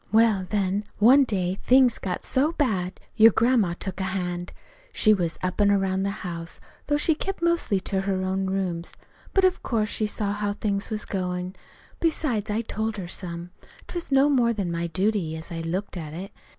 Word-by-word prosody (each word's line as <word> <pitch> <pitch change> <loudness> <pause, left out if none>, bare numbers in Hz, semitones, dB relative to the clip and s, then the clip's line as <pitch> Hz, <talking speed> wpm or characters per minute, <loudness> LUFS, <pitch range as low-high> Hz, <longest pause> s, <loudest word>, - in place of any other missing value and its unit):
"Well, 215 -4 +3
then, 200 -1 0
one 260 +6 +6
day 190 -4 -1
things 255 -2 +4
got 185 -2 -4
so 290 +5 +1
bad 195 - -1 0.2
your 225 0 +8
grandma 225 -6 +2
took 190 -1 -5
a - - -1
hand. 180 -2 -3 0.4
She 215 - +5
was 175 -5 -1
up 185 +3 -1
an' 205 - +5
around 195 -1 +1
the 200 0 -3
house, 170 -1 -6 0.3
though 290 - +2
she 320 +2 +3
kept 385 +5 -4
mostly 340 - +2
to 190 0 -1
her 190 -1 -1
own 190 +1 -1
rooms. 185 -3 -2 0.4
But 385 -1 +3
of 370 0 +2
course 215 -3 0
she 215 - 0
saw 210 -1 -1
how 205 0 -1
things 200 -1 -2
was 215 -2 -2
goin'. 180 -1 -3 0.4
Besides, 285 -10 0
I 210 +2 0
told 220 -1 -3
her 185 -3 -5
some. 175 -1 -5 0.4
'T - - -10
was 345 -4 -5
no 270 +1 +5
more 245 -5 +3
than 195 -5 -2
my 170 0 -2
duty, 185 -2 0
as 160 +3 -7
I 165 -1 -4
looked 185 +6 -3
at 155 -4 -6
it. 190 +3 -7
200 Hz, 195 wpm, -25 LUFS, 180-225 Hz, 0.4 s, your